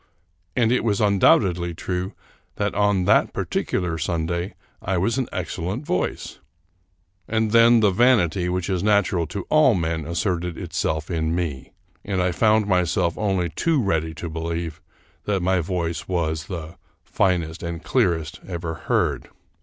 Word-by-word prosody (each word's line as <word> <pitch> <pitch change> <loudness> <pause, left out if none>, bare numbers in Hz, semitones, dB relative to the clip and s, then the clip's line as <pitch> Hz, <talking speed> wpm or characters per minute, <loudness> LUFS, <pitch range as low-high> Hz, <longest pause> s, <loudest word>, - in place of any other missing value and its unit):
And 115 -2 +3
it 125 - +2
was 105 -4 +1
undoubtedly 95 -4 +3
true 90 +2 -3 0.4
that - - -1
on 100 -2 +2
that - - +3
particular 85 -3 -2
Sunday 85 +3 -2 0.3
I 95 0 -1
was 115 +8 +1
in 130 - -2
excellent 90 - -4
voice; 90 - -2 0.9
and 110 -1 0
then 115 0 +6
the 105 -2 +4
vanity 95 -6 +3
which 90 -1 -1
is 95 -3 -1
natural 100 -5 +2
to 100 +4 -5
all 150 -7 +5
men 80 -3 -2
asserted 85 0 -2
itself 80 -2 -2
in 80 -1 0
me, 80 -7 -4 0.3
and 95 -2 -2
I 90 0 +2
found 110 +3 +3
myself 90 -2 +1
only 95 -4 0
too 160 - +1
ready 80 -7 0
to 85 - -5
believe 80 0 -4 0.4
that 100 -3 0
my 95 0 +2
voice 85 -1 -3
was 80 -3 -1
the 85 -3 -7 0.2
" - - -44
finest 85 -3 0
and 85 -1 -5
clear 105 -10 +2
est 80 0 -8
" - - -18
ever 85 -2 -4
heard. - - -1
90 Hz, 155 wpm, -23 LUFS, 85-100 Hz, 0.9 s, then